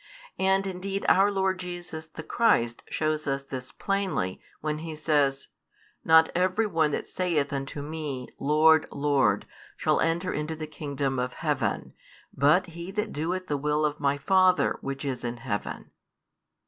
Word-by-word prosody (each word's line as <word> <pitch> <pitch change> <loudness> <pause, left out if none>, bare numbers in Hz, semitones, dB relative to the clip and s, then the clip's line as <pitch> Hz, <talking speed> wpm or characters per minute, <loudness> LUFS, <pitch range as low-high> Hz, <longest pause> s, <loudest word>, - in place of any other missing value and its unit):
And 190 +1 +3
indeed 195 +1 -3
our 195 +2 +5
Lord 190 -1 0
Jesus 175 -3 -6
the 160 0 -9
Christ 120 - +2
shows 155 -1 -1
us 135 0 -1
this 130 -2 -7
plainly, 195 - -2 0.2
when 150 0 -2
He 160 -1 -6
says: 145 -3 +1 0.5
Not 160 0 +6
every 185 +5 +2
one 165 -6 +2
that 145 - -3
saith 160 -6 0
unto 140 +1 -4
Me, 150 -4 -5
Lord, 155 +2 +5
Lord, 135 -8 +2 0.3
shall - - +2
enter 170 +3 0
into 150 +2 -3
the 155 0 -5
kingdom 140 -3 -3
of 125 0 -2
heaven; - - -1 0.4
but 150 +7 +4
he 170 +2 -7
that 210 +2 -3
doeth 175 +5 -2
the 145 -5 -1
will 150 +2 +1
of 150 0 -2
My 140 -1 +1
Father, 185 +4 +3
Which 135 +1 -4
is 130 -3 -3
in 120 0 -3
heaven. 105 -3 -4
155 Hz, 155 wpm, -27 LUFS, 140-180 Hz, 0.5 s, Not